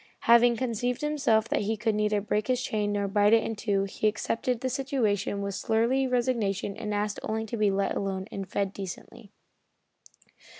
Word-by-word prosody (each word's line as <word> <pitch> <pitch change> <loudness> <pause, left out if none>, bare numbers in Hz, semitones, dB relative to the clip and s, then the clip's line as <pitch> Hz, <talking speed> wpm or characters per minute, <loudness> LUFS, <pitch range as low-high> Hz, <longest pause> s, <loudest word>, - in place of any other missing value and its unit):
Having 235 0 +5
convinced 245 0 -2
himself 275 -7 +2
that - - +1
he 215 +2 -1
could 220 +1 0
neither 210 0 +1
break 210 0 -1
his 255 -1 +1
chain 210 -4 -1
nor 200 -1 0
bite 205 +2 +3
it 225 - +5
in 225 - -3
two, 200 -2 0
he 195 +2 -1
accepted 230 +3 -1
the 260 - -1
situation 235 -7 -1
with 200 0 -3
surly 235 +6 +1
resignation 235 -6 0
and 210 - -5
asked 205 0 -1
only 220 +1 -2
to 225 - -5
be 210 -2 +2
let 195 0 0
alone 190 -1 -2
and 195 -1 -6
fed 200 -1 -1
decently. 200 +3 -8
215 Hz, 180 wpm, -28 LUFS, 200-235 Hz, -, Having